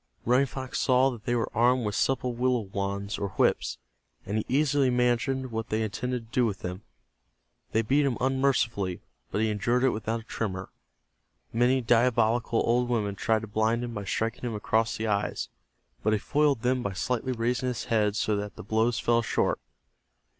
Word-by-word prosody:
Running 125 +4 +4
Fox 130 0 -4
saw 130 +1 +4
that 115 -3 -10
they 120 - +1
were 115 - -2
armed 120 +1 +3
with 105 - -1
supple 125 +2 0
willow 125 0 +1
wands 100 +1 -3
or 100 - -2
whips, - - +2 0.5
and 105 - -3
he - - -3
easily 140 0 +3
imagined 125 +1 +1
what 110 -1 -3
they 110 +1 0
intended 125 +3 -3
to 110 - -25
do - - +5
with 105 -5 -1
them. 90 +2 -5 0.9
They 110 - +2
beat 140 +6 +3
him 125 - -1
unmercifully, 125 -8 0 0.3
but 105 - -1
he 110 -1 +2
endured 120 +5 +1
it 130 - +4
without 110 +2 -2
a - - -16
tremor. 95 -5 -4 0.8
Many 125 +3 +3
diabolical 115 -1 +2
old 120 +1 +2
women 105 -4 0
tried 110 +3 0
to - - -6
blind 110 +3 +1
him 120 -1 -4
by 105 -2 -5
striking 115 +3 -2
him 120 -3 -3
across 110 +2 0
the 110 - -2
eyes, 105 -1 -1 0.5
but 110 - +2
he - - +3
foiled 145 +1 +1
them 125 +1 +2
by 100 -4 -3
slightly 125 +6 -1
raising 125 +2 -1
his 125 -2 -2
head 105 -3 +1
so 110 -1 +1
that 105 0 -5
the - - -9
blows 110 +3 +1
fell 120 0 +2
short. 115 - 0
115 Hz, 190 wpm, -28 LUFS, 110-125 Hz, 0.9 s, do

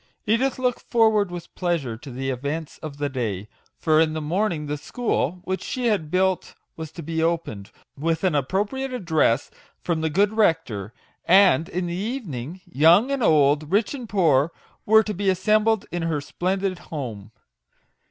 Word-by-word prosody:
Edith 240 +5 +1
looked 250 -2 0
forward 220 -4 +3
with 175 -1 -8
pleasure 170 -10 -1
to 135 +5 -11
the 135 +1 -3
events 145 +5 -4
of 155 -3 -8
the 145 0 -1
day; 110 -7 -3 0.3
for 155 -1 +3
in 160 -1 +2
the 160 - -2
morning 165 0 -1
the 145 0 -2
school 175 - -2
which 190 0 -3
she 250 -1 -3
had 190 -8 0
built 185 +1 0 0.2
was 160 -2 -7
to 170 - -8
be 160 +1 -2
opened, 165 -12 -2 0.3
with 160 +4 -1
an 185 -4 +2
appropriate 205 - -1
address 160 - +1 0.3
from 165 -2 -1
the 160 - 0
good 200 +6 +2
rector; 160 - +1 0.3
and 180 -5 +5
in 180 +1 -2
the 170 - -3
evening, 185 - -5
young 170 - +4
and 275 -2 -1
old, 150 -3 +3
rich 205 +6 +2
and 250 -5 -7
poor, 160 -6 +3 0.4
were 220 +1 +6
to 210 - -3
be 200 +1 0
assembled 215 +3 +2
in 175 - -2
her 165 -2 -1
splendid 185 +5 -2
home. 115 -10 -7
170 Hz, 170 wpm, -24 LUFS, 145-205 Hz, 0.4 s, were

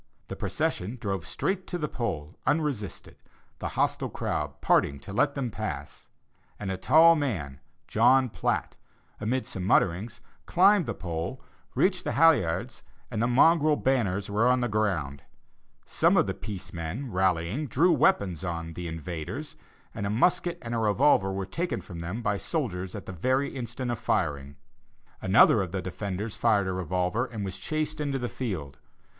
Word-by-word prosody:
The - - -4
procession 105 +8 -2
drove 95 -5 -3
straight 190 -1 -2
to 175 - -3
the 150 -3 -2
pole 90 - -4
unresisted, 145 -10 -2 0.4
the - - -3
hostile - - +1
crowd 75 -1 -3
parting 70 0 +2
to 100 - -9
let 140 +7 +2
them 130 -4 -2
pass; - - -6 0.5
and 100 -2 -3
a - - -1
tall 160 - +6
man, 90 - -3 0.3
John 130 -1 +4
Platt, 90 -8 -2 0.4
amid 125 +5 -1
some 95 - -6
mutterings, 100 +4 +1 0.3
climbed 190 -2 +5
the 115 - -2
pole, 85 +8 -4 0.4
reached 185 -1 +2
the - - -2
halliards, 140 - +3 0.3
and 110 - -1
the 120 - +2
mongrel 150 +4 +5
banners 105 -9 0
were 105 +4 +2
on 125 0 +3
the 120 - +1
ground. 95 - -1 0.6
Some - - +3
of - - +4
the - - -2
peace 100 -4 -7
men, 85 - -4
rallying, 95 - 0
drew 165 +8 +3
weapons 130 - +2
on 85 -2 -4
'the 90 +1 -5
invaders,' 85 - -5 0.4
and 100 - -3
a - - -2
musket 170 - +2
and 115 0 -4
a 115 - 0
revolver 105 -2 +3
were 95 0 -3
taken 170 - -2
from 85 -3 -9
them 90 +8 -4
by 100 -1 +1
soldiers 95 - -3
at 100 - -7
the - - -6
very 130 - +1
instant 120 0 -4
of 120 - -3
firing. 70 -7 -1 0.7
Another 100 +2 +6
of 95 -3 -4
the 95 - -2
defenders 100 +3 -4
fired 105 -4 +3
a 95 - -1
revolver, 90 - -1
and 110 -5 -5
was 95 - -5
chased 155 0 -2
into 140 -2 -1
the 125 -2 -2
fields. 85 - -5
105 Hz, 165 wpm, -27 LUFS, 90-135 Hz, 0.7 s, tall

